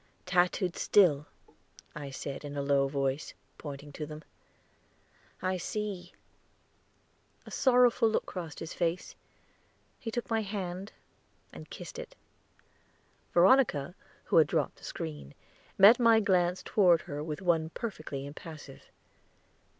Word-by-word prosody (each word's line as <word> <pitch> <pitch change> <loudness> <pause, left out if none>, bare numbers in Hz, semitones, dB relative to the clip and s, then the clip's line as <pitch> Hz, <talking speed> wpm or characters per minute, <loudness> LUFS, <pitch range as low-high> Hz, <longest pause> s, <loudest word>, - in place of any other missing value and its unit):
"Tattooed 180 0 +1
still," 150 -8 +4 0.7
I 145 -2 -6
said 135 +1 -6
in 145 0 -6
a 140 - -1
low 140 -1 +3
voice, 135 +1 -2 0.2
pointing 145 -1 -8
to 150 +1 -6
them. 155 +1 -9 1.2
"I 185 0 0
see" 195 -2 -4 1.3
a - - -11
sorrowful 245 -3 +4
look 220 - 0
crossed 170 -4 -7
his 165 - -6
face; 170 +1 -2 0.9
he 230 - -5
took 240 +1 -3
my 225 -1 0
hand 195 -1 -5 0.6
and - - -11
kissed - - -8
it. - - -9 1.2
Veronica, 175 - +4 0.3
who - - +1
had 155 -3 +7
dropped - - -1
the - - -20
screen, 75 -3 -6 0.4
met 210 +6 +8
my 230 -2 +6
glance 180 -3 +1
toward 175 -6 +4
her 145 +1 -6
with 155 +3 -5
one 165 -3 +2
perfectly 155 -9 -5
impassive. 145 -1 -10
175 Hz, 125 wpm, -30 LUFS, 145-200 Hz, 1.3 s, met